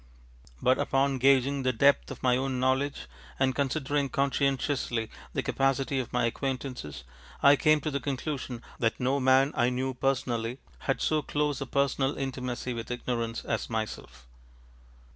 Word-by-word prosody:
But 130 +1 +4
upon 135 0 +1
gauging 135 +1 +4
the 130 -1 +2
depth 140 +4 +3
of 135 - -9
my 125 -1 +4
own 130 0 -1
knowledge 130 +2 0 0.3
and 130 -1 +2
considering 140 0 0
conscientiously 135 -4 0 0.2
the - - -1
capacity 135 0 +1
of 125 - -4
my 125 -1 +1
acquaintances, 125 - -4 0.4
I 140 +1 +8
came 155 +1 +3
to 155 - -2
the 140 - -1
conclusion 135 -2 -4 0.2
that 115 -1 0
no 130 +3 +1
man 130 +2 +4
I 120 - +3
knew 130 +1 -2
personally 120 -2 -1 0.2
had - - -1
so 155 -1 +2
close 145 -1 -1
a 135 - -3
personal 140 0 +1
intimacy 125 -2 -3
with 115 -1 -6
ignorance 120 -2 -3
as - - -2
myself. 110 - -5
130 Hz, 150 wpm, -28 LUFS, 125-140 Hz, 0.4 s, I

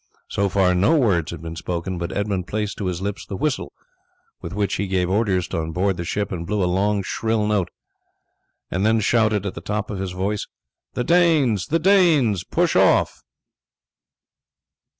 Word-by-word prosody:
So 100 0 0
far 95 -1 +3
no 100 - +3
words 95 - +2
had - - -7
been 80 0 -6
spoken, 90 +1 -4
but 85 +1 -3
Edmund 100 -3 -2
placed 105 -1 -3
to 100 - -2
his 90 0 -3
lips 100 0 -3
the 95 - -6
whistle 140 - -2 0.7
with 85 - -6
which 100 0 -1
he 100 - -2
gave 95 -1 0
orders 95 -4 +1
on 80 0 -2
board 95 +2 +1
the 85 - -3
ship 100 +4 -2
and 85 -3 -4
blew 105 -1 0
a - - +2
long 100 +3 +1
shrill 110 +2 -1
note, 105 -4 0 1.0
and 95 +2 -1
then 110 +1 +3
shouted 110 -1 +2
at 100 - -3
the 85 - -8
top 105 +3 -3
of 100 - -4
his 95 -2 -4
voice: 100 +3 -2 0.5
"The 125 - 0
Danes! 155 - +3
the 165 - +2
Danes! 160 - +3
push - - 0
off!" - - +3
100 Hz, 180 wpm, -22 LUFS, 90-110 Hz, 1.0 s, far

